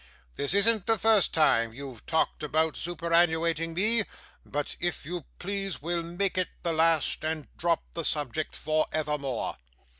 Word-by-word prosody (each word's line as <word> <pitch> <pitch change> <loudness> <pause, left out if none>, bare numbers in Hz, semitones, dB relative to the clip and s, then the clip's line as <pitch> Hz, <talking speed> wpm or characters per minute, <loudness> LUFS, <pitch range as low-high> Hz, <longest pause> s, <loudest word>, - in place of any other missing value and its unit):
'This 140 +7 +1
isn't 215 0 +4
the 225 -1 +3
first 220 -1 +4
time 115 -8 +3
you've 130 -4 -9
talked 160 -1 +1
about 155 +1 +1
superannuating 165 -1 +1
me; 215 +5 +4 0.4
but, 145 0 -3
if 175 -4 -2
you 175 -1 -5
please, 195 0 -3
we'll 170 +2 -1
make 180 +3 -1
it 185 - 0
the 170 - 0
last, 160 -1 +2
and 155 -2 -2
drop 170 -1 +1
the 165 - -3
subject 150 0 -1
for 155 +1 0
evermore. 150 -5 -2
165 Hz, 150 wpm, -28 LUFS, 155-175 Hz, 0.4 s, isn't